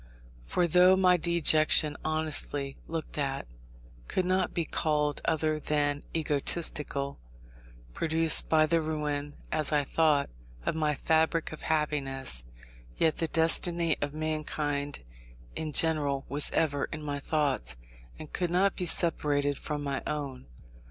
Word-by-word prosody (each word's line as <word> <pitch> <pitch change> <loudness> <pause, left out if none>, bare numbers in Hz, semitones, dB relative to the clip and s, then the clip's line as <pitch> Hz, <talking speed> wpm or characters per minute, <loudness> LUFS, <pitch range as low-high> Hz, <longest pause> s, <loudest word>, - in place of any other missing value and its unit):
For 175 - +1
though 180 +2 +6
my 185 -1 +4
dejection, 155 -3 +4
honestly 155 -3 0
looked 160 -2 -5
at, 135 -1 -2 0.6
could 185 - -1
not 185 0 +1
be 170 - -2
called 150 -3 0
other 155 -1 0
than 145 -1 0
egotistical, 145 -2 -1 0.7
produced 160 0 +3
by 155 -1 +5
the 165 +1 +1
ruin, 150 -2 -3 0.2
as 155 -1 +2
I 150 -1 +2
thought, 150 - +2 0.3
of - - 0
my 155 -2 0
fabric 160 +3 +1
of 155 - -9
happiness, 135 - -1 0.5
yet 160 - +2
the 165 - 0
destiny 165 +1 +1
of 145 0 -2
mankind 150 - -3 0.5
in 155 -1 -4
general 145 -3 +1
was 145 +2 +3
ever 145 -3 0
in 155 -1 -8
my 145 -1 -3
thoughts, 140 - -1 0.4
and 155 - -11
could 175 -1 -1
not 190 +3 +2
be 180 - -2
separated 145 -4 +1
from 145 +1 -5
my 140 -1 -2
own. 140 -4 -4
155 Hz, 130 wpm, -29 LUFS, 145-160 Hz, 0.7 s, though